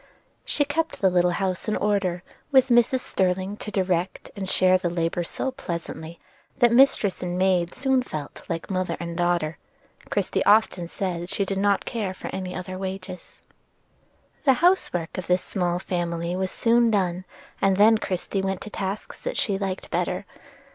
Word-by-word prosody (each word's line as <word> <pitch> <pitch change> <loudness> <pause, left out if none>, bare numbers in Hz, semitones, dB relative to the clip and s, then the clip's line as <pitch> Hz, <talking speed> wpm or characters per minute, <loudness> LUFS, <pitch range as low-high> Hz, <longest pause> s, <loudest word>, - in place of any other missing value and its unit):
She 290 - +1
kept 320 +3 -2
the 190 -2 +4
little 180 0 +3
house 190 0 -2
in 215 - +1
order, 195 -4 0 0.3
with 265 -1 +5
Mrs. 240 +2 +4
Sterling 190 -2 0
to 210 - -6
direct 185 -2 -1
and 195 -2 -4
share 185 0 +4
the 175 - -1
labor 170 0 -1
so 265 +9 -3
pleasantly, 170 -8 -6 0.4
that 240 -1 +5
mistress 235 -6 +4
and 180 0 -2
maid 180 -2 +2
soon 265 -1 +2
felt 155 - -7
like 165 +2 -4
mother 185 -1 -1
and 170 -1 -5
daughter, 175 -2 0 0.4
and - - -22
Christie - - 0
often 205 -4 +3
said 175 -1 -3
she 200 - 0
did 195 0 -2
not 200 0 +2
care 205 -5 -3
for - - -7
any 185 -1 -4
other 185 0 -5
wages. 190 -1 -7 1.0
The 270 - +6
house 350 +8 +3
work 170 0 -3
of 180 - -7
this 180 0 +2
small 175 -3 -1
family 175 -1 -2
was 190 0 -1
soon 235 +2 +3
done, 185 -4 0 0.4
and 195 -1 +3
then 220 +2 +6
Christie 190 -1 -2
went 190 -1 -2
to 210 - -8
tasks 195 +1 -5
that - - -3
she 195 -2 +1
liked 190 -2 -4
better. 180 +2 -1
190 Hz, 175 wpm, -25 LUFS, 175-210 Hz, 1.0 s, The